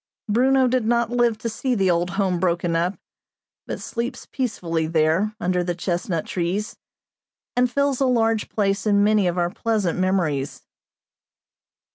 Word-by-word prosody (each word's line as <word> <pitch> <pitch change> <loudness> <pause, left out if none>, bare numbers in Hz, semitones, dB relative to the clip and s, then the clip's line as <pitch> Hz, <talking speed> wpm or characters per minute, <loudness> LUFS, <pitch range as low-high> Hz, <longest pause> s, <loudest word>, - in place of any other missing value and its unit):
Bruno 260 +4 +3
did 250 -1 +1
not 235 0 +1
live 240 -2 +2
to 220 - -4
see 245 +3 -1
the 190 -4 +2
old 175 +1 0
home 190 -4 +1
broken 175 -1 0
up, 175 +4 0 0.7
but - - -4
sleeps 240 +2 -4
peacefully 170 - -2
there, 165 +6 +1
under 180 -3 0
the 175 0 -2
chestnut 175 -1 -2
trees, 185 +4 -2 0.8
and 250 0 +3
fills 280 +1 0
a 265 - +4
large 225 -3 +1
place 200 0 0
in 200 -1 +4
many 210 -2 +3
of 175 0 -1
our 175 0 +1
pleasant 205 -5 -1
memories. 170 -7 0
200 Hz, 150 wpm, -23 LUFS, 175-235 Hz, 0.8 s, a